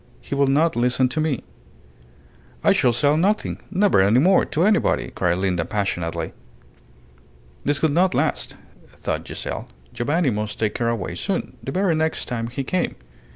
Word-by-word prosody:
He -, -, -7 dB
will 140 Hz, 0 st, +3 dB
not 155 Hz, +5 st, +3 dB
listen 125 Hz, +2 st, +2 dB
to 155 Hz, -, -1 dB
me." 155 Hz, -6 st, -1 dB, 1.2 s
"I -, -, +5 dB
shall 125 Hz, -, +3 dB
say 145 Hz, +5 st, +2 dB
nothing 195 Hz, +7 st, 0 dB
never 200 Hz, -, +3 dB
any 100 Hz, +5 st, +4 dB
more 180 Hz, +8 st, +5 dB
to 160 Hz, -, 0 dB
anybody," 210 Hz, +2 st, +2 dB
cried 90 Hz, 0 st, +1 dB
Linda, 90 Hz, -3 st, 0 dB
passionately. 85 Hz, -4 st, -2 dB, 1.3 s
This 145 Hz, 0 st, +2 dB
could 160 Hz, +1 st, +2 dB
not 180 Hz, +5 st, +2 dB
last, -, -, -1 dB, 0.4 s
thought -, -, -3 dB
Giselle. -, -, -5 dB, 0.3 s
Giovanni 145 Hz, +3 st, +1 dB
must 105 Hz, 0 st, -3 dB
take 110 Hz, -2 st, -1 dB
her 120 Hz, -, +1 dB
away 115 Hz, -7 st, -2 dB
soon 185 Hz, -, -3 dB
the -, -, -5 dB
very 185 Hz, -1 st, +1 dB
next 160 Hz, 0 st, 0 dB
time 115 Hz, -2 st, -3 dB
he 125 Hz, +3 st, -4 dB
came. 185 Hz, +6 st, -1 dB
135 Hz, 160 wpm, -22 LUFS, 105-165 Hz, 1.3 s, I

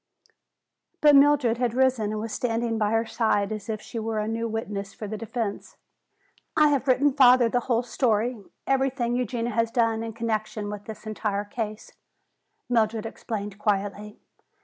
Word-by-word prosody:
But 295 Hz, -1 st, +6 dB
Mildred 275 Hz, -5 st, +4 dB
had 245 Hz, -2 st, 0 dB
risen 255 Hz, -5 st, +2 dB
and 215 Hz, -, -3 dB
was 220 Hz, 0 st, -5 dB
standing 230 Hz, -1 st, -1 dB
by 210 Hz, -1 st, +2 dB
her 225 Hz, +1 st, +1 dB
side 220 Hz, -3 st, 0 dB
as 215 Hz, 0 st, -6 dB
if 215 Hz, -1 st, -2 dB
she 230 Hz, -, -6 dB
were 220 Hz, 0 st, -3 dB
a 210 Hz, 0 st, -1 dB
new 230 Hz, +1 st, -2 dB
witness 205 Hz, -3 st, -4 dB
for 215 Hz, -, -6 dB
the 215 Hz, -, -4 dB
defense. 220 Hz, -1 st, -5 dB, 0.8 s
"I 300 Hz, -1 st, +6 dB
have 280 Hz, -1 st, 0 dB
written 270 Hz, +2 st, +3 dB
father 250 Hz, -2 st, +6 dB
the 245 Hz, -, +1 dB
whole 240 Hz, -1 st, 0 dB
story, 235 Hz, -2 st, 0 dB, 0.2 s
everything 265 Hz, -3 st, 0 dB
Eugenia 240 Hz, -1 st, -2 dB
has 230 Hz, +1 st, +1 dB
done 230 Hz, -1 st, +1 dB
in 225 Hz, 0 st, -5 dB
connection 215 Hz, -2 st, -3 dB
with 205 Hz, 0 st, -7 dB
this 220 Hz, 0 st, -9 dB
entire 210 Hz, -1 st, -2 dB
case," 215 Hz, 0 st, -5 dB, 0.8 s
Mildred 225 Hz, -2 st, +1 dB
explained 210 Hz, -3 st, -5 dB
quietly. 205 Hz, 0 st, -2 dB
225 Hz, 165 wpm, -26 LUFS, 215-245 Hz, 0.8 s, But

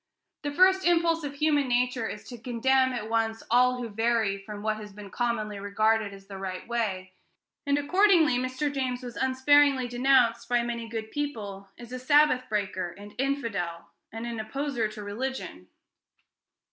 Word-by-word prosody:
The 290 Hz, -, -2 dB
first 375 Hz, +4 st, +4 dB
impulse 335 Hz, -1 st, +2 dB
of 285 Hz, -1 st, -5 dB
human 290 Hz, -2 st, +2 dB
nature 245 Hz, -1 st, +1 dB
is 210 Hz, -, -7 dB
to 245 Hz, -, -8 dB
condemn 260 Hz, +3 st, +2 dB
at 235 Hz, -4 st, -4 dB
once 225 Hz, 0 st, -1 dB
all 250 Hz, +1 st, +4 dB
who 245 Hz, -1 st, -4 dB
vary 225 Hz, -1 st, +1 dB
from 205 Hz, +1 st, -9 dB
what 215 Hz, 0 st, 0 dB
has 210 Hz, -1 st, -9 dB
been 200 Hz, -1 st, -11 dB
commonly 215 Hz, -3 st, -2 dB
regarded 215 Hz, +1 st, +1 dB
as 195 Hz, 0 st, -13 dB
the 195 Hz, -1 st, -9 dB
right 185 Hz, -1 st, -5 dB
way; 195 Hz, -6 st, -2 dB, 0.5 s
and, 280 Hz, 0 st, +3 dB
accordingly, 325 Hz, -3 st, +4 dB
Mr. 255 Hz, +3 st, -2 dB
James 255 Hz, -2 st, -2 dB
was 245 Hz, -1 st, -7 dB
unsparingly 265 Hz, 0 st, +3 dB
denounced, 245 Hz, -1 st, +2 dB
by 240 Hz, -1 st, +2 dB
many 235 Hz, -1 st, -4 dB
good 220 Hz, -1 st, -5 dB
people, 210 Hz, -10 st, -5 dB
as 240 Hz, 0 st, -11 dB
a 255 Hz, -, -5 dB
Sabbath 270 Hz, -1 st, +3 dB
breaker, 195 Hz, -4 st, -2 dB
and 205 Hz, +1 st, -11 dB
infidel, 200 Hz, -12 st, -2 dB, 0.2 s
and 225 Hz, +1 st, -6 dB
an 235 Hz, -1 st, -4 dB
opposer 240 Hz, +1 st, -2 dB
to 215 Hz, 0 st, -9 dB
religion. 205 Hz, -, -5 dB
240 Hz, 165 wpm, -27 LUFS, 210-270 Hz, 0.5 s, first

